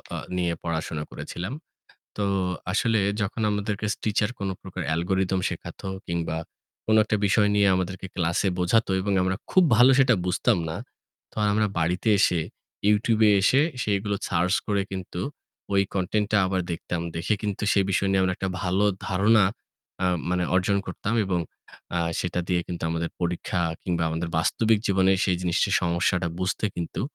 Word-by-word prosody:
আ - - -3 0.2
নিয়ে 85 -1 0
পড়াশোনা 80 -2 -3
করেছিলাম। 90 +9 -6 0.6
তো 105 - 0 0.5
আসলে 110 +2 +2 0.2
যখন 110 +3 -2
আমাদেরকে 105 0 -2
স - - -8
টিচার 105 0 +1
কোন 100 - -2
প্রকার 95 -1 -7
অ্যালগরিথম 95 +3 0
শেখাতো - - -7 0.2
কিংবা 85 -2 -2 0.5
কোনো 110 0 +4
একটা 105 0 0
বিষয় 105 +1 +3
নিয়ে 100 -1 +4
আমাদেরকে 95 +1 -3
ক্লাসে 85 +2 +1
বোঝাতো 100 +4 +2
এবং 100 +1 -1
আমরা 95 +1 0 0.2
খুব 185 - +6
ভালো 125 +4 +7
সেটা 125 -4 +5
বুঝতাম 90 +4 +2
না। 80 - -4 0.6
তো - - -18
আমরা 105 0 +2
বাড়িতে 90 +7 0
এসে 90 -3 +3 0.5
YouTube 110 +1 +2
এ - - +6
এসে 130 +8 +4 0.2
সেগুলো 100 0 0
সার্চ 90 +1 +1
করে 100 -1 +1
কিন্তু 90 -2 -5 0.5
ওই 100 - +5
কনটেন্টটা 105 +3 0
আবার 95 0 0
দেখতাম। 85 0 -3
দেখে 85 +6 0
কিন্তু 105 -1 -3
সেই 100 -1 +3
বিষয় 95 +2 +1
নিয়ে 95 -1 +3
আমরা 95 - +1
একটা 95 - -2
ভালো 95 +3 +1 0.2
ধারণা 105 +3 +4 0.6
আ - - +3 0.2
মানে 90 0 +1
অর্জন 95 +2 +2
করতাম 100 +4 -3
এবং 90 -2 0 0.6
আ - - +1 0.2
সেটা 90 0 -2
দিয়ে 90 -2 +1
কিন্তু 85 -2 -5
আমাদের 85 0 -2
পরীক্ষা 90 +1 -1 0.2
কিংবা 85 -2 -1
আমাদের 80 +1 -3
বাস্তবিক 110 +6 +2
জীবনে 95 -1 +3
সেই 95 - +2
জিনিসের 90 -2 +1
সমস্যাটা 85 +1 +1
বুঝতে 95 +3 -1
কিন্তু 85 +2 -4
95 Hz, 160 wpm, -25 LUFS, 90-105 Hz, 0.6 s, ভালো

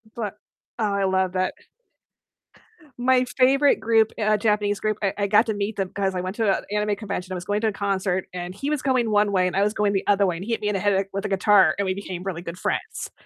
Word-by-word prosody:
But 210 -3 -4 0.4
oh, 210 -3 0
I 200 -1 0
love 190 -1 +1
that. 185 0 0 1.4
My 255 +1 +3
favorite 275 +2 +4
group 225 -1 +3
uh, 215 0 +3
Japanese 210 -1 0
group, 215 -1 -1
I 195 - +1
I 200 0 0
got 215 +3 +4
to 220 - 0
meet 205 +1 -3
them 195 -2 -2
'cause 195 -2 -1
I 180 - -1
went 185 +4 -5
to 220 -3 +1
a 190 - +1
anime 210 0 0
convention. 190 -3 -5
I - - -3
was 175 - -5
going 205 +2 -1
to 220 - +1
a - - +1
concert, 190 -2 -1
and 180 +1 -6
he 275 +8 -3
was 300 -3 -1
going 250 -5 +1
one 205 0 +3
way, 185 -1 +3
and 180 - -3
I 200 - +3
was 210 +1 +1
going 210 -1 +1
the 195 - -2
other 200 -1 +4
way, 175 -2 -1
and 190 - -7
he 235 - -4
hit 225 - -1
me 210 - 0
in - - -1
the - - 0
head, 205 0 +2
like, 195 0 -1
with 195 0 -4
a - - +1
guitar, 195 +1 +4
and 200 - 0
we 185 - 0
became 185 -2 -6
really 180 -3 -4
good 170 0 -7
friends. - - -3
200 Hz, 270 wpm, -24 LUFS, 190-215 Hz, 1.4 s, favorite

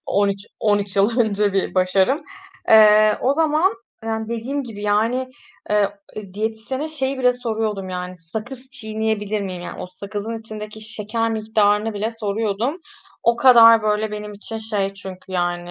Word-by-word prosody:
13- 200 +1 0
13 205 -2 +1
yıl 220 +5 +3
önce 205 -2 +1
bir 195 0 -1
başarım. 190 - +2 0.5
Eee, 215 -1 +7
o 270 +3 +2
zaman, 315 +3 +2 0.3
eee, 225 - -2 0.2
dediğim 250 +5 -3
gibi, 215 -4 -9
yani, 225 +5 +1 0.4
eee, 205 -1 +1 0.4
diyetisyene 220 +7 -3
şeyi 270 -3 -2
bile 250 -1 +4
soruyordum, 220 -5 -3
yani, 180 0 -5
sakız 235 +10 -8
çiğneyebilir 220 -3 -2
miyim? 185 -3 -5
Yani, - - -7
o - - -5
sakızın 205 +4 -6
içindeki 215 -1 -8
şeker 225 +1 -2
miktarını 215 -1 +1
bile 215 +3 -1
soruyordum. 220 - -2 0.5
O 235 0 +3
kadar 230 -3 +8
böyle 210 0 0
benim 210 0 -6
için 220 +2 -7
şey 205 -3 -2
çünkü 190 -1 -10
yani, 175 -1 -1
215 Hz, 145 wpm, -21 LUFS, 200-230 Hz, 0.5 s, kadar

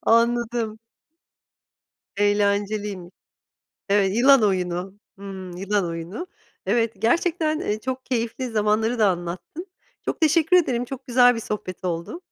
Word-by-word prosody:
Anladım. 230 -1 +1 1.4
Eğlenceliymiş. 205 -2 0 0.8
Evet 200 0 +3
yılan 270 +2 +6
oyunu, 185 -1 -1 0.3
hımm, 190 -2 -8
yılan 200 0 0
oyunu. 170 - -5 0.4
Evet, 230 -1 +1
gerçekten, 315 - +1
eee, 210 +1 -2
çok 260 +3 -4
keyifli 245 +1 -2
zamanları 220 +2 +1
da 210 - +5
anlattın. 180 - -5 0.4
Çok - - -3
teşekkür 320 +3 +4
ederim, 250 -8 +1
çok 265 +1 -8
güzel 245 0 +5
bir - - -3
sohbet 205 -5 -5
oldu. 170 - -3
220 Hz, 115 wpm, -23 LUFS, 195-245 Hz, 1.4 s, yılan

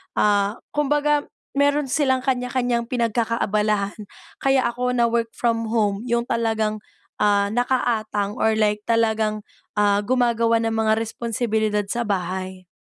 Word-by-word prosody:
ah, 205 0 +2 0.2
kumbaga 295 0 +1 0.3
meron 285 -1 +2
silang 260 -2 +2
kanya-kanyang 245 -2 0
pinagkakaabalahan. 215 -4 0 0.4
Kaya 270 -1 +2
ako 250 +1 -2
na-work-from-home 230 -2 0
yung 235 -1 +1
talagang, 220 -2 0 0.4
ah, 200 -1 +2
nakaatang 220 -4 -1
or 220 0 +2
like 210 -1 +1
talagang, 220 -2 +1 0.4
ah, 205 -1 +3
gumagawa 230 -2 +2
ng 225 0 0
mga 220 -1 +2
responsibilidad 220 -2 -1
sa 240 +1 -1
bahay. 185 -1 -3
230 Hz, 110 wpm, -22 LUFS, 210-245 Hz, 0.4 s, ah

